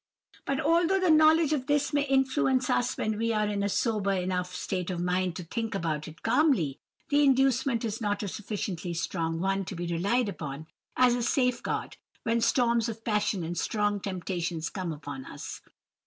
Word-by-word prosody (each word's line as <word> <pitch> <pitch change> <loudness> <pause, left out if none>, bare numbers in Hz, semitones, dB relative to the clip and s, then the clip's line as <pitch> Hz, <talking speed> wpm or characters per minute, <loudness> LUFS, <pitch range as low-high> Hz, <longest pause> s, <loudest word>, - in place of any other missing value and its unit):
"But 275 0 -1
although 340 +5 +3
the 370 -3 +3
knowledge 310 0 +5
of 265 -3 -2
this 290 0 +1
may 290 - +3
influence 265 -1 +2
us 245 - +1
when 215 -1 -1
we 230 0 +1
are 215 -1 +1
in 205 -1 -1
a 200 - 0
sober 205 -2 +1
enough 180 -1 -2
state 185 -2 -3
of 180 -2 -3
mind 180 0 0
to 180 - -5
think 225 +5 -3
about 155 -4 -2
it 160 0 -12
calmly, 225 - +2 0.3
the 290 0 +4
inducement 265 -3 +3
is 225 +1 -3
not 205 -1 -1
a - - -2
sufficiently 190 -4 -4
strong 165 -1 -2
one 195 +2 0
to 190 - -6
be 175 +1 -4
relied 200 +8 +1
upon 150 -6 -6 0.3
as 250 -1 +5
a 245 - -1
safe 250 +1 +1
guard, - - -3 0.3
when 230 0 +1
storms 235 -1 +2
of 225 0 -7
passion 210 -4 0
and 170 +1 -3
strong 205 -1 0
temptations 175 -4 -3
come 185 -4 -3
upon 145 -3 -7
us. - - -8
210 Hz, 185 wpm, -28 LUFS, 180-255 Hz, 0.3 s, knowledge